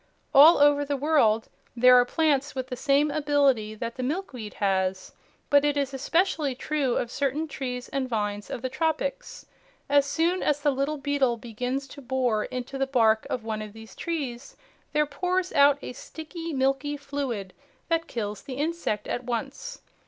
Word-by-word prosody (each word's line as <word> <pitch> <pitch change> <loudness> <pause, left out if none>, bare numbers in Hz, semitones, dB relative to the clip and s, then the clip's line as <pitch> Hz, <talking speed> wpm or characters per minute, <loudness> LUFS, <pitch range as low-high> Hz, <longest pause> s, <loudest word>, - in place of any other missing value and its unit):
All 300 +5 +9
over 290 0 +5
the 285 0 -2
world 260 -7 +2 0.3
there 250 +1 +6
are 245 0 +6
plants 290 -1 +1
with 260 -1 -4
the 250 - -3
same 285 +3 +2
ability 280 -8 +2
that 230 +2 -5
the - - -3
milkweed 255 - -4
has, 190 -2 0 0.4
but 285 0 +6
it 290 0 +1
is 275 -1 -1
especially 300 0 0
true 270 -1 -1
of 240 - -2
certain 285 +3 -1
trees 250 -3 -5
and 265 -2 -2
vines 205 -2 -2
of 240 - -5
the - - 0
tropics. 415 - -2 0.4
As 285 0 +3
soon 335 +5 +1
as 295 -1 +1
the 290 0 +2
little 275 +3 -1
beetle 275 -4 +1
begins 250 +4 -4
to 285 - -11
bore 250 -4 0
into 255 +2 -5
the 270 - +1
bark 225 -4 +3
of 245 - -3
one 220 -1 -3
of 210 -1 -8
these 220 0 -12
trees, 275 -6 -5 0.3
there 300 0 +2
pours 365 +5 -1
out 285 0 +6
a - - -6
sticky, 325 +5 -7
milky 270 +1 0
fluid 275 -9 -4 0.3
that 330 -1 0
kills 210 -4 -4
the 260 - -7
insect 295 - -2
at 245 - -3
once. 270 - -5
275 Hz, 175 wpm, -26 LUFS, 240-295 Hz, 0.4 s, All